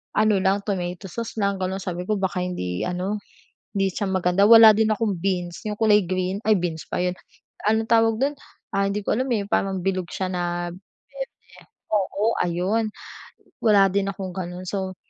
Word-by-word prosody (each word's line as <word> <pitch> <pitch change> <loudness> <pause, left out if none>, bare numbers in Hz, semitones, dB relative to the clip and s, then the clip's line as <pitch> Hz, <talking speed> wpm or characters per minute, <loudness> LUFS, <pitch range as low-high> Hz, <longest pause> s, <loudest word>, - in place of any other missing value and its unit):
ano 215 -2 +3
lang 195 +1 +1
tomato 180 -1 -3
sauce 230 -1 -5
lang 200 -1 0
ganun 190 +1 -2
sabi 180 -1 -4
ko 215 - +1
"Baka 185 -1 -1
hindi 90 - -3
ano, 185 +4 -2 0.6
hindi 195 -1 +1
siya 200 +2 -2
maganda." 185 +1 +2
Wala 225 -1 +10
din 220 0 +2
akong 205 -4 -1
beans 180 -1 -2
yung 210 - -2
kulay 210 -2 +5
green, 185 +2 -1
ay 215 - +6
beans 165 -2 -3
ba - - -1
yun, 180 0 -1 0.5
anong 220 +1 +2
tawag 225 -1 +4
dun? 275 +2 +2 0.4
Ah, 195 0 +2
hindi 205 +1 -2
ko - - 0
alam 255 +4 -1
eh 205 - -1
yung 200 - -17
parang 195 -1 +1
bilog 185 -2 -1
siya 190 - -2
na 175 -1 -2
berde. - - -11 0.5
Oo, 210 +2 +1
ayun. 185 +6 0 0.7
Wala 205 -3 +5
din 200 0 +1
akong 190 -1 -6
ganun 180 -1 -5
so 190 -1 -3
195 Hz, 185 wpm, -24 LUFS, 180-210 Hz, 0.7 s, Wala